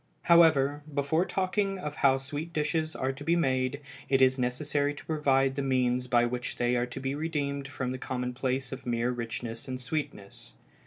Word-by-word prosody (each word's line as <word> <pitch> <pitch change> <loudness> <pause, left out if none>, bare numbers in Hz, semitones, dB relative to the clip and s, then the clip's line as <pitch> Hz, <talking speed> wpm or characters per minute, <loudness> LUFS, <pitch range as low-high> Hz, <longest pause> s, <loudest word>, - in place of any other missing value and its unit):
However, 155 -4 +5
before 145 +5 +1
talking 195 +1 0
of 150 -5 -6
how 135 -2 +4
sweet 145 +5 -5
dishes 155 +1 -1
are 130 +1 -1
to 135 +2 -9
be 165 +3 +2
made 130 -3 0 0.3
it 135 - +4
is 130 0 +4
necessary 145 +3 0
to - - -11
provide 135 -4 +2
the 140 - -1
means 125 -2 +1
by 120 -1 +4
which 125 +1 -3
they 120 0 +1
are 120 0 0
to 125 +2 -7
be 135 0 -2
redeemed 145 -2 -2
from 130 -2 -3
the 130 - -5
commonplace 125 +1 -2
of 135 -1 -7
mere 120 +1 +1
richness 115 -1 -5
and 130 -1 -4
sweetness. 130 - -5
135 Hz, 180 wpm, -29 LUFS, 125-150 Hz, 0.3 s, However